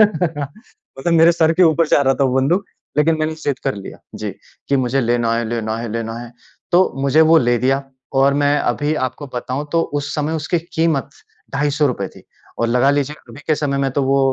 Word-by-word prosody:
मतलब 170 - -1
मेरे 165 +1 +6
सिर 165 -1 +3
के 180 +3 +3
ऊपर 165 0 +4
जा - - +4
रहा 135 -1 +3
था 140 - +1
वो 130 -1 +1
बंदूक, 175 +9 +1 0.3
लेकिन 160 +2 +3
मैंने 155 0 -1
ज़िद 145 -4 -3
कर 135 - 0
लिया। 100 -1 -9 0.2
जी, - - -4 0.4
कि 140 - +3
मुझे 130 +1 +1
लेना 120 -1 +1
है, 115 - -1
लेना 110 -1 -2
है, 115 0 -4
लेना 115 -1 -3
है। 120 0 -9 0.4
तो 180 +2 +4
मुझे 140 +3 +4
वो 165 - +7
ले 120 0 +3
दिया, 135 +3 +1 0.3
और 135 +1 +3
मैं 145 +1 +3
अभी 145 +4 0
आपको 130 +3 -8
बताऊँ 130 +4 -3
तो 165 - +3 0.2
उस 145 - -5
समय 150 +1 -1
उसकी 175 +3 0 0.2
कीमत 160 -5 +1 0.5
₹250 140 -7 0
थी - - -16 0.4
और 115 - +1
लगा 125 +3 +3
लीजिए, 145 +1 -1
अभी - - -11
के 155 - +3
समय 145 -2 -1
में 135 -1 0
तो 140 - 0
वो 135 +1 +2
140 Hz, 210 wpm, -19 LUFS, 125-155 Hz, 0.5 s, वो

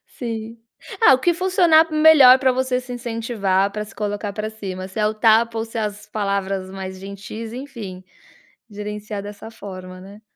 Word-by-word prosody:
Sim. 230 -1 -6 0.4
Ah, 270 - +8
o - - +1
que 345 +6 +2
funcionar 345 -3 +4
melhor 305 -5 +7
para 260 -1 +3
você 255 0 0
se 250 0 -9
incentivar, 225 -5 -1
para 210 +1 -4
se 210 - -15
colocar 205 0 -3
para 215 +1 -4
cima. 190 -4 -6
Se 190 - -9
é 210 - +3
o 215 - -1
tapa 225 +1 +3
ou 225 - -1
se 230 +1 -10
é - - 0
as 210 0 -5
palavras 195 -2 -2
mais 190 -1 -7
gentis, 200 +3 -8
enfim, 230 -8 -8 0.7
gerenciar 210 0 -6
dessa 205 +2 -9
forma, 185 -4 -9
né? 200 +2 -13
215 Hz, 180 wpm, -21 LUFS, 200-245 Hz, 0.7 s, Ah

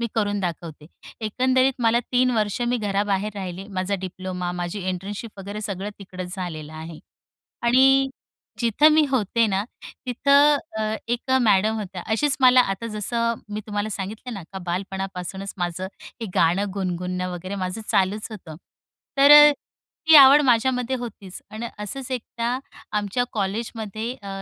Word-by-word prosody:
मी 235 - 0
करून 205 -2 0
दाखवते." 165 -4 -5 0.4
एकंदरीत 260 +4 +2
मला 230 +1 +3
3 250 0 +3
वर्ष 210 +2 0
मी 245 - +1
घराबाहेर 205 0 -1
राहिले. 190 -1 -6
माझा 190 0 -2
डिप्लोमा, 185 -1 -4
माझी 175 +3 -4
इंटर्नशिप 200 +4 -5
वगैरे 200 +2 -6
सगळं 200 -1 -4
तिकडंच 185 -2 -7
झालेलं 160 -4 -6
आहे. 160 0 -8 0.6
आणि 270 +3 +5 0.5
जिथं 235 +6 +4
मी 310 -1 +5
होते 230 -1 +2
ना, 195 -1 0 0.4
तिथं 280 +4 +4 0.2
अ, 215 0 -1
एक 240 +3 -2
मॅडम 215 0 +3
होत्या. 190 -3 -6
अशीच 265 +5 +1
मला 255 0 +7
आता 230 +4 -7
जसं 230 +2 -1 0.2
मी 215 - -3
तुम्हाला 205 0 -2
सांगितलंय 210 +5 -6
ना, 195 -5 -7
का 190 - -5
बालपणापासूनच 190 +1 -4
माझं 175 +1 -3 0.3
हे - - -2
गाणं 185 +5 +2
गुणगुणणं 180 -1 -3
वगैरे 185 +3 -6
माझं 185 +3 -4
चालूच 195 +3 +1
होतं. 175 -7 -9 0.6
तर 280 +1 +7
अ, 295 0 +10 0.6
ती 320 - +10
आवड 280 +1 +9
माझ्यामध्ये 250 0 +2
होतीच. 220 -6 -8
अन् 220 +1 -7 0.2
असंच 255 +5 -6
एकदा 235 -1 -3 0.5
आमच्या 210 +4 0
कॉलेजमध्ये 220 +2 -3
अ, 200 - -10
205 Hz, 145 wpm, -23 LUFS, 185-240 Hz, 0.6 s, अ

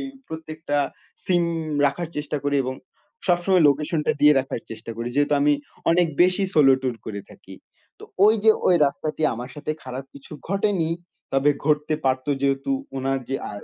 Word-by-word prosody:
এই - - -4 0.2
প্রত্যেকটা 160 -1 -5 0.5
সিম 180 -3 +2 0.4
রাখার 160 +4 -2
চেষ্টা 150 0 -3
করি 145 0 +1
এবং 130 0 -3 0.5
সবসময় 180 0 +3
লোকেশনটা 150 +2 +1
দিয়ে 150 0 +7
রাখার 130 -3 -5
চেষ্টা 115 +1 -8
করি 115 +1 -3
যেহেতু 145 +1 +2
আমি 145 +1 +4 0.4
অনেক 175 +1 +4 0.2
বেশি 185 +2 +2
সোলো 135 -3 +6
ট্যুর 125 -3 -1
করে 100 -2 -5
থাকি। - - -13 0.4
তো - - -11 0.2
ওই 215 - +6
যে 220 - +8 0.2
ওই 180 - +5
রাস্তাটি 155 +2 -3
আমার 120 +2 -7
সাথে 150 +1 -5
খারাপ 130 +1 -6
কিছু 140 +1 -13 0.2
ঘটেনি, 195 -4 0 0.4
তবে 135 +2 +3 0.2
ঘটতে 150 0 +2
পারতো 130 +1 0
যেহেতু 135 - 0 0.3
উনার 135 0 -1
যে 135 - -1
আ - - -6
150 Hz, 165 wpm, -23 LUFS, 135-170 Hz, 0.5 s, যে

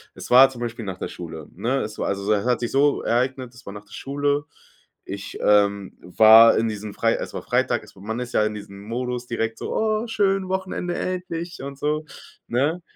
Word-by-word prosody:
es - - -9
war, 130 +2 +9
zum 125 -3 -10
Beispiel, 120 -1 -4
nach 95 -2 -5
der - - -4
Schule, 80 -3 -8
ne? 125 +9 0
Es 105 0 -6
war - - -1
also 100 +1 -1
es 100 -1 0
hat 125 - +2
sich 120 - -2
so 140 +1 +3
ereignet 130 +1 -1
es 120 - -15
war 100 - -6
nach 105 0 -10
der - - -25
Schule. 145 +1 -1 0.6
Ich, 100 0 -6
ähm, 100 -1 +2
war 110 +5 +7
in 115 - +1
diesem 105 -1 -5
frei - - +2
es - - -4
war - - -5
Freitag - - 0
es - - -17
war 95 - -15
man 110 +4 -4
ist 125 -1 -6
ja - - +3
in 105 0 -1
diesem 100 -1 -10
Modus 125 +3 -4
direkt 115 -1 -2
so: - - -4
„Oh, 220 +1 0
schön, 195 -4 +1
Wochenende, 185 -2 -2
endlich“ 175 -2 -4
und 140 0 -7
so, 150 +2 -1 0.4
ne? 145 +9 0
120 Hz, 220 wpm, -23 LUFS, 105-145 Hz, 0.6 s, war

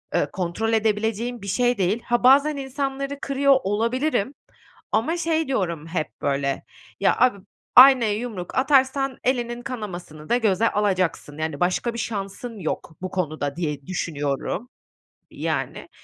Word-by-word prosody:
ııı, - - +1
kontrol 190 +5 -1
edebileceğim 220 +2 0
bir 200 - -8
şey 245 +4 +1
değil. 200 +5 +1
Ha, 240 +1 0
bazen 285 +3 +6
insanları 275 +1 -3
kırıyor 275 0 +3
olabilirim. 235 +5 0 0.6
Ama 320 +10 +1
şey 325 -1 0
diyorum, 170 - -2
hep 165 -3 -4
böyle, 140 -1 -1 0.4
"Ya - - +3
abi, 250 -5 +4 0.4
aynaya 255 -5 +8
yumruk 215 -7 -6
atarsan 270 -1 +2
elinin 240 -2 -1
kanamasını 180 - -7
da 240 - +4
göze 220 -1 +2
alacaksın, 185 -7 0
yani, 155 -2 -3
başka 185 +7 0
bir 235 - -5
şansın 215 +2 -5
yok 160 -1 -4
bu 185 - -4
konuda." 155 -5 -2
diye 150 -5 -4
düşünüyorum, 165 - -3 0.6
yani. - - -3
220 Hz, 135 wpm, -23 LUFS, 180-255 Hz, 0.6 s, aynaya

